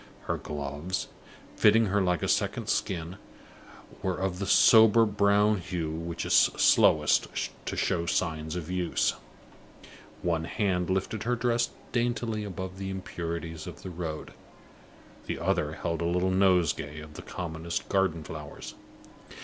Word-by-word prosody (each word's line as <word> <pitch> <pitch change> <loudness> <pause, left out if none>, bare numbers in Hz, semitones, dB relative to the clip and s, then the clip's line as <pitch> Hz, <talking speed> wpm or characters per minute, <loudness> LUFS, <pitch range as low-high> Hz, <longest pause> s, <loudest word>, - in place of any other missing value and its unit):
Her - - -2
gloves, 75 +5 -4 0.5
fitting 110 +1 +5
her 100 0 +1
like 90 -3 0
a - - 0
second - - 0
skin, 85 0 -2 0.8
were 95 -2 -1
of 95 -1 -2
the 100 - -3
sober 110 +2 +7
brown 105 0 +3
hue 85 -2 -3
which 85 +1 -4
is - - 0
slowest - - +4 0.4
to - - -3
show 85 -2 0
signs 80 -3 -1
of 90 -1 -5
use. 90 -2 +1 1.1
One 80 -2 0
hand 90 -2 -1
lifted 95 +3 -1
her 120 +2 0
dress 120 0 +1 0.2
daintily 120 -2 -1
above 95 -1 -6
the 95 -1 -4
impurities 85 -4 -5
of - - -9
the 95 - -6
road; 80 -3 -5 0.9
the - - -2
other 75 0 0
held 85 +1 -3
a - - 0
little 90 +2 +1
nosegay 90 -6 +2
of 75 0 -11
the - - -8
commonest 85 -1 -5
garden 95 -5 +1
flowers. 75 -1 -8
90 Hz, 140 wpm, -28 LUFS, 80-100 Hz, 1.1 s, sober